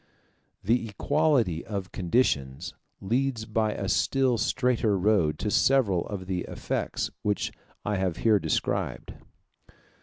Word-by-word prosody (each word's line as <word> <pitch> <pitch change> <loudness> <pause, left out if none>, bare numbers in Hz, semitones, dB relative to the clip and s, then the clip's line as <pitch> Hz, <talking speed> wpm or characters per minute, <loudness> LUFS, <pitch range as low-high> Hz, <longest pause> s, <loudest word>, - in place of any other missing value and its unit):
The 115 +2 +1
equality 115 - +1
of 100 -4 -5
conditions 85 - 0 0.3
leads 120 +2 0
by 110 -1 0
a 95 - -4
still 130 +2 +2
straighter 115 -1 +1
road 90 -6 +2
to 105 - -2
several 110 -11 +3
of 100 -3 -5
the 90 -1 -2
effects - - -3
which 105 -1 -1 0.3
I 105 -1 0
have 95 -3 -1
here 110 -3 +3
described. 80 -3 -2
105 Hz, 120 wpm, -27 LUFS, 90-120 Hz, 0.3 s, several